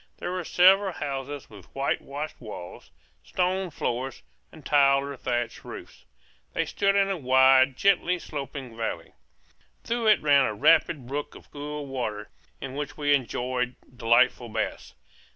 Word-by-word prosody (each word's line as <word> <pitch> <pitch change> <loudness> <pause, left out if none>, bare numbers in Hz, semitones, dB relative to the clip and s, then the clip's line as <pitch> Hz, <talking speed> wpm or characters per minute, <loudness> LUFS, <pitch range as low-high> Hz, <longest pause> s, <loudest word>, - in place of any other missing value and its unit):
There 175 - -4
were 185 -1 -3
several 190 +3 +4
houses 140 -1 -5
with 100 -3 -14
whitewashed 140 +2 -3
walls, 105 -6 -9 0.3
stone 180 - -1
floors, 130 -3 -4 0.3
and 155 - -15
tiled 140 -1 +4
or 140 0 -6
thatched 120 -2 -3
roofs. - - -11 0.5
They - - 0
stood 200 0 +1
in 200 -1 +3
a 190 - -1
wide, 130 -1 +5
gently 180 -2 +2
sloping 135 -6 -7
valley. 115 0 -4 0.7
Through 235 -1 -1
it 215 - +5
ran 140 -2 +5
a 110 - -2
rapid 150 +1 +3
brook 145 +3 -5
of - - -15
cool 150 0 -6
water, 110 -6 -4 0.3
in 135 -1 -6
which 145 0 -5
we 145 -1 +2
enjoyed 125 -1 -1 0.2
delightful 120 0 +3
baths. - - -4
140 Hz, 145 wpm, -26 LUFS, 125-155 Hz, 0.7 s, wide